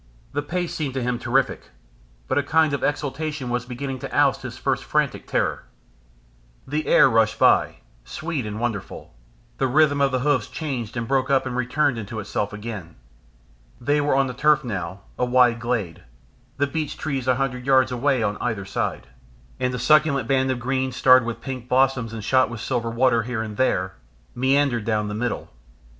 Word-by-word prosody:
The 145 - 0
pace 175 +3 -3
seemed 140 -4 -3
to 130 - -1
him 125 -1 -1
terrific, 125 +3 0 0.6
but 130 - +1
a - - +3
kind 155 +1 +2
of 140 - -2
exultation 145 -2 -2
was 125 0 -2
beginning 130 +1 -5
to - - -7
oust - - +3
his - - -7
first - - -1
frantic - - -1
terror. - - -1 1.0
The 150 +3 -2
air - - +6
rushed 115 -1 +2
by, - - +4 0.3
sweet 155 -7 -4
and 105 +1 -5
wonderful, 110 - -4 0.5
the 135 - +2
rhythm 145 +1 +3
of 140 -1 +3
the 130 -1 0
hoofs 140 -5 +1
changed 125 -7 -5
and 115 -1 -3
broke 135 0 +1
up 135 -1 +3
and 125 - -4
returned 125 +1 +1
into 110 +1 -6
itself 105 0 -3
again. 105 -6 -7 0.8
They 145 +4 +1
were 145 -2 +1
on 135 0 +3
turf 150 +3 +3
now, 95 -5 -5 0.2
a 125 - +2
wide 125 -2 +4
glade 115 -8 -2 0.6
the 140 - +2
beech 150 +1 -4
trees 135 -4 -3
a 130 - +4
hundred 125 -1 -3
yards 130 -1 +4
away 125 0 +1
on 105 0 -1
either 110 -5 -2
side, 100 - -3 0.5
and 125 0 0
a 125 - -3
succulent 150 +2 +3
band 130 -1 +2
of 130 - 0
green 130 +1 -1
starred 130 -1 +5
with 115 -1 -5
pink 130 -2 -6
blossom 130 -2 +2
and 110 -2 -6
shot 130 +4 +3
with 115 -2 -7
silver 120 -2 -2
water 120 0 +2
here 115 -1 -3
and 105 -1 -7
there, 95 -6 0 0.4
meandered 130 -2 +2
down 105 -1 -1
the - - -4
middle. 120 +2 -3
130 Hz, 185 wpm, -23 LUFS, 115-140 Hz, 1.0 s, air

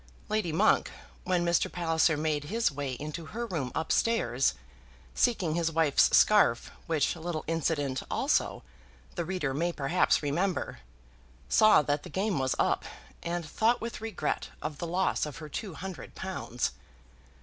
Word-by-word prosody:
Lady 215 -5 0
Monk, 160 - +3 0.4
when 180 -1 +1
Mr. 170 -1 +2
Palliser 165 -2 +2
made 150 -1 -1
his 225 +5 +1
way 140 -1 -4
into 155 +5 -6
her 235 - -1
room 155 - -3
up 160 - -2
stairs, 135 - +2 0.6
seeking 200 -10 +1
his 165 0 0
wife's 160 -3 +4
scarf, 200 - +4 0.2
which 155 -2 +1
little 165 -1 -4
incident, 150 -5 -1
also, - - 0 0.5
the 170 - -2
reader 170 -5 -2
may 170 +5 0
perhaps 155 +2 +2
remember, 170 - -1 0.7
saw 215 -8 +6
that 145 0 0
the - - -10
game 195 -4 -1
was 130 -1 0
up, - - +1 0.4
and 170 -1 -3
thought 225 +9 +2
with 230 -1 -6
regret 210 -9 -2
of 150 -1 -5
the 170 - -3
loss 180 -2 0
of 150 - -8
her 155 - -8
two 180 +4 -5
hundred 190 -1 -8
pounds. 180 -10 -3
165 Hz, 150 wpm, -29 LUFS, 145-185 Hz, 0.7 s, saw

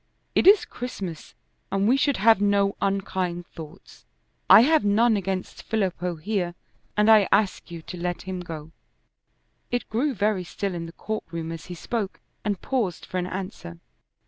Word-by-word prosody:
It - - +3
is 405 +1 +7
Christmas, 195 -10 -7 0.4
and 195 +1 +1
we 250 - +5
should 280 -1 +2
have 220 +1 +5
no 200 -1 +2
unkind 190 -3 -1
thoughts. 160 +2 -12 0.5
I - - +10
have 315 +5 +4
none 220 +3 +4
against 190 -1 -3
Filippo 185 -5 -1
here, 175 0 -2 0.4
and 210 0 +4
I 215 -3 +7
ask 205 -4 +1
you 170 -2 -8
to 180 - -8
let 175 0 -3
him 185 -1 -5
go." 160 -3 -7 1.0
It 245 0 -2
grew 260 +5 0
very 205 -2 +1
still 195 +2 -4
in 170 -1 -5
the - - -9
court 215 +5 -5
room 165 -1 -5
as 165 -1 -8
he 180 - -6
spoke 205 +3 -3 0.2
and 205 -3 -2
paused 230 -10 -1
for 185 - -3
an 180 - -2
answer. 185 - -6
195 Hz, 170 wpm, -25 LUFS, 175-215 Hz, 1.0 s, I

